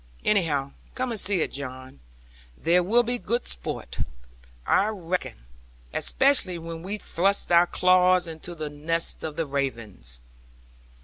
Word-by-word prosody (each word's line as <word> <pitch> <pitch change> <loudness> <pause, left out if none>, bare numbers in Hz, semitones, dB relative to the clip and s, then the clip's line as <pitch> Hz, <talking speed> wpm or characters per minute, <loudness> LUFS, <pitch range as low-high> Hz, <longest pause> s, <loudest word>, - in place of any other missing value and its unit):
Anyhow, 150 -9 +1 0.2
come 255 -1 -2
and 225 - -1
see 195 -3 +1
it, - - -1
John. 130 - -7 0.6
There 175 +2 +3
will 230 +7 +4
be 245 +1 -2
good 235 +2 -2
sport, - - -5 0.7
I 200 - +3
reckon; 180 - -4 0.5
especially 265 -10 +3
when 165 0 -7
we 195 +4 -4
thrust 195 -1 +1
our 170 +1 +6
claws 185 0 +4
into 165 +1 -7
the 155 -2 -5
nest 165 +3 0
of 155 -2 -4
the 165 - -1
ravens. 115 - -4
170 Hz, 135 wpm, -26 LUFS, 145-195 Hz, 0.7 s, our